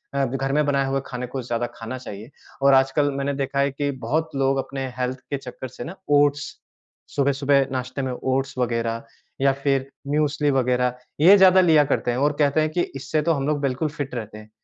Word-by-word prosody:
अ, 140 0 +2
ब 130 +1 -4
घर 135 0 -2
में 150 0 +2
बनाए 140 -1 +1
हुए 135 0 0
खाने 125 0 -5
को 130 +1 -5
ज़्यादा 120 0 -2
खाना 115 +3 -6
चाहिए। 110 -1 -9 0.3
और 140 0 +6
आजकल 135 +2 +3
मैंने 140 +1 -1
देखा 140 +1 -3
है 140 0 +2
कि 145 +1 -2 0.2
बहुत 160 +6 0
लोग 135 0 +1
अपने 135 0 -4
हेल्थ 125 +1 -2
के 140 - 0
चक्कर 130 0 -8
से 120 - -8
ना, 170 +7 -7
ओट्स, 145 0 +4 0.7
सुबह-सुबह 140 0 +2
नाश्ते 130 +1 -3
में 130 -1 -2
ओट्स 130 +1 -2
वग़ैरह 115 -2 -1 0.4
या 135 0 +4
फिर 135 -1 +1 0.3
मूसली 150 -1 +1
वग़ैरह, 125 -1 +1 0.2
ये 190 +6 +8
ज़्यादा 190 0 +7
लिया 160 -4 +5
करते 120 - 0
हैं 120 - -2
और 145 +2 +2
कहते 145 +1 +3
हैं 155 - +1
कि, 175 +2 0
"इससे 150 +3 -1
तो 165 - +2
हम 140 -1 -2
लोग 150 -1 0
बिल्कुल 140 +3 -1
फिट 145 -2 -6
रहते 110 -2 -6
हैं।" 110 0 -14
135 Hz, 215 wpm, -23 LUFS, 125-145 Hz, 0.7 s, ये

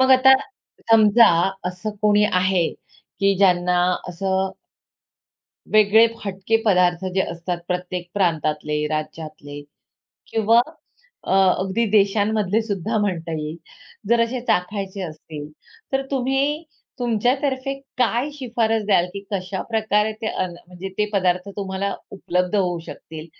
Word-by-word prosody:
मग 260 0 +4
आता 265 +1 +7 0.6
समजा 225 +1 +7 0.4
असं 180 +4 -5
कोणी 210 0 +4
आहे, 185 -2 +2 0.5
की 195 0 +3
ज्यांना 180 -2 +3 0.3
असं 190 +2 -1 1.2
वेगळे 215 +1 +6 0.2
हटके 195 +3 0
पदार्थ 180 -3 +3
जे 190 - +4
असतात 170 +1 -4
प्रत्येक 180 -1 -3
प्रांतातले, 150 -5 0
राज्यातले 155 -1 -6 0.7
किंवा 225 +1 +4 0.6
अ, - - -2 0.3
अगदी 190 +5 0
देशांमधले 205 0 +2
सुद्धा 215 +1 -2
म्हणता 175 -5 -2
येईल. 155 +1 -5 0.5
जर 235 0 +4
असे 235 +2 0
चाखायचे 195 +1 -1
असतील 155 -3 -8 0.4
तर 270 0 +1
तुम्ही 275 +3 0 0.4
तुमच्यातर्फे 260 +3 0 0.2
काय 250 +3 +1
शिफारस 230 -5 0
द्याल, 190 -4 +3
की 200 - -4
कशा 190 0 -3
प्रकारे 220 -1 +1
ते - - -2
अन्न, 180 -4 -3
म्हणजे 180 +2 -7
ते 210 - +2
पदार्थ 185 -1 +1
तुम्हाला 195 0 -2 0.2
उपलब्ध 180 0 -1
होऊ 180 -3 +1
शकतील, 160 0 -9
195 Hz, 120 wpm, -22 LUFS, 180-225 Hz, 1.2 s, आता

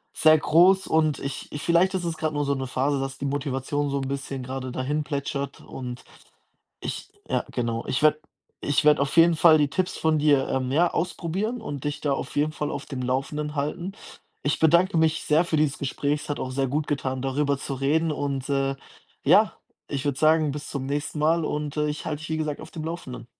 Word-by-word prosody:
sehr 155 0 +6
groß 180 +5 +5
und 155 -3 +2
ich 140 0 -6
ich 145 - -5
vielleicht 180 +3 +3
ist 180 - -1
es 165 -2 -3
grad 155 -1 -1
nur 145 -1 0
so 140 - +1
'ne 135 -1 -3
Phase, 135 +2 0
dass 135 0 -4
die 140 - -4
Motivation 140 +1 -1
so 140 - -1
'n 135 - -3
bisschen 135 -1 -4
grade 130 0 -5
dahinplätschert 140 0 -3
und 125 -1 -7 0.8
ich - - -5 0.2
ja, - - 0
genau. 115 -2 -2
Ich 135 - -1
werde 155 0 +5 0.4
ich 145 +1 +1
werde 150 -1 +6
auf 140 +4 -1
jeden 165 0 +7
Fall 160 0 +7
die 145 -1 +2
Tipps 180 +6 -1
von 160 -1 +2
dir, 145 -3 +3
ähm, 130 -1 -1
ja, 170 +4 +4
ausprobieren 185 +7 -2
und 140 -3 -6
dich 145 +1 -2
da 145 -2 +1
auf - - -5
jeden 150 +1 +2
Fall 150 -1 -3
auf - - -5
dem 130 -3 -5
Laufenden 150 +4 -2
halten. 170 +7 -3 0.5
Ich 145 - 0
bedanke 170 +3 +4
mich 160 0 +2
sehr 155 +3 +3
für 160 - 0
dieses 150 -2 +1
Gespräch. 145 +2 -1
Es - - -11
hat 145 - -2
auch 130 - -3
sehr 135 +1 0
gut 150 +3 -1
getan, 130 -3 -2
darüber 140 +1 0
zu 140 - -5
reden. 155 +4 +1
Und, 140 -2 -2
äh, 135 -1 +1 0.5
ja, - - +5 0.4
ich 140 0 -3
würde 140 -2 0
sagen, 155 -1 +4
bis 150 +1 -6
zum 135 -2 -4
nächsten 145 +2 -3
Mal 160 +2 +3
und, 150 -1 -3
äh, 150 0 +1
ich 150 - -5
halte 150 -1 -3
dich, 160 - -8
wie 160 - -1
gesagt, 155 -2 -3
auf - - -10
dem 160 -2 -6
Laufenden. 145 -8 -6
145 Hz, 220 wpm, -25 LUFS, 135-155 Hz, 0.8 s, jeden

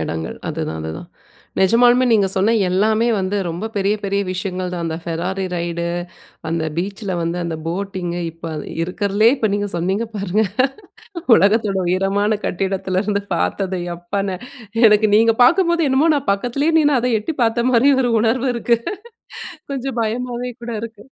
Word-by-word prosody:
இடங்கள் 80 0 -4
அதுதான், 80 - -3
அதுதான். 80 +1 -6 0.5
நெஜமாலுமே 240 +6 +5
நீங்க 205 -4 +4
சொன்ன 200 +4 +2 0.2
எல்லாமே 215 +5 +2
வந்து 190 +2 -1
ரொம்ப 180 +7 -4
பெரிய 200 +1 +2
பெரிய 200 0 0
விஷயங்கள் 185 0 -3
தான் 170 -1 -3
அந்த 160 -1 -2
ஃபெராரி 180 +3 -2
ரைட் 170 0 -3 0.7
அந்த 165 -1 -1
பீச்சில 195 +1 -3
வந்து 170 +1 -2
அந்த 165 -1 -3
போட்டிங் 185 0 -3 0.2
இப்ப 165 0 -8 0.3
இருக்கறலயே 205 +6 +2
இப்ப 220 - 0
நீங்க 205 0 -1
சொன்னீங்க 190 +6 0
பாருங்க 200 +2 0 0.9
உலகத்தோட 205 +1 +3
உயரமான 195 +4 +1
கட்டிடத்துலருந்து 195 +2 -1
பாரத்தது 180 - -1 0.2
எப்பான்னு. 190 +2 -3 0.5
எனக்கு 210 0 +5
நீங்க 225 0 +4
பாக்கும்போது 340 +2 +4
என்னமோ 280 +5 +3
நான் 280 -5 -2
பக்கத்திலேயே 275 +10 0
நின்னு 290 -4 +3
அத 245 - -1
எட்டி 290 +9 -4
பாத்த 235 +1 +1
மாரி 255 +4 +5
ஒரு 245 -2 +1
உணர்வு 245 +3 +1
இருக்கு. 235 0 +1 0.9
கொஞ்சம் 270 -2 -4
பயமாவே 245 +2 -3
கூட 235 0 -5
இருக்கு. 225 -2 -8
200 Hz, 140 wpm, -19 LUFS, 185-235 Hz, 0.9 s, நெஜமாலுமே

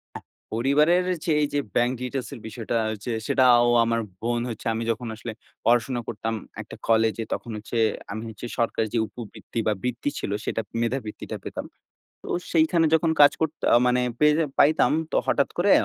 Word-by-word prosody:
অ্যা - - -6 0.3
পরিবারের 150 +10 +3 0.2
যে 165 - +1
এইযে 145 0 0 0.2
bank 120 +1 +3
details 125 0 -3
এর 125 - -10
বিষয়টা 110 0 -4
হচ্ছে, 110 +2 -4
সেটা 130 - +3
আও 120 - +4 0.2
আমার 115 0 0 0.2
বোন 120 +1 0
হচ্ছে 115 -3 -7
আমি 115 - -2
যখন 115 +1 -2
আসলে 115 +1 -6 0.3
পড়াশোনা 120 +1 +2
করতাম 115 +1 -3 0.3
একটা - - -11
কলেজে। 110 0 +2
তখন 120 - -7
হচ্ছে 110 +3 -6 0.4
আমি 110 - -5
হচ্ছে 110 +1 -8
সরকারের 115 -2 0
যে - - +3
উপবৃত্তি 115 -1 -9
বা, 110 - +3
বৃত্তি 125 +2 -2
ছিল, - - -4
সেটা - - -1 0.2
মেধাবৃত্তিটা 115 -2 -3
পেতাম। - - -5 0.6
তো - - -11 0.3
সেখানে 165 0 +4
যখন 160 0 +3
কাজ 145 - +8
করত 160 -2 +1 0.2
আ - - +8
মানে 125 0 +3 0.2
পেয়ে 150 0 +5 0.2
পাইতাম। 155 +3 +5 0.2
তো - - +2
হঠাৎ 140 - +2
করে 190 +3 +3
120 Hz, 175 wpm, -25 LUFS, 115-145 Hz, 0.6 s, কাজ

